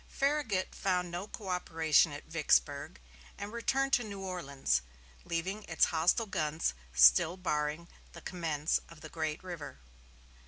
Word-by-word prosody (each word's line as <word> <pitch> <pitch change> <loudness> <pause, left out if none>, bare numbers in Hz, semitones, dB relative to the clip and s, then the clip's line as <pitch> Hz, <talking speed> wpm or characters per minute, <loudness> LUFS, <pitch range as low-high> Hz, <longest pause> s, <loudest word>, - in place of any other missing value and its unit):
Farragut 275 -9 0
found 180 -2 -1
no 175 +4 -4
coöperation 165 -6 +1
at 145 - -8
Vicksburg, 145 - +1 0.4
and 205 +2 -6
returned 270 +3 0
to 245 - +4
New 200 -3 -7
Orleans, 140 - -1 0.4
leaving 185 +5 -2
its 165 - +3
hostile 170 +8 +3
guns 155 - -1 0.2
still 65 - +6
barring 155 -2 -2 0.3
the - - -10
commerce 160 -4 -1
of 165 -2 -14
the 155 - -9
great 155 0 -3
river. 170 - -7
170 Hz, 130 wpm, -32 LUFS, 150-190 Hz, 0.4 s, still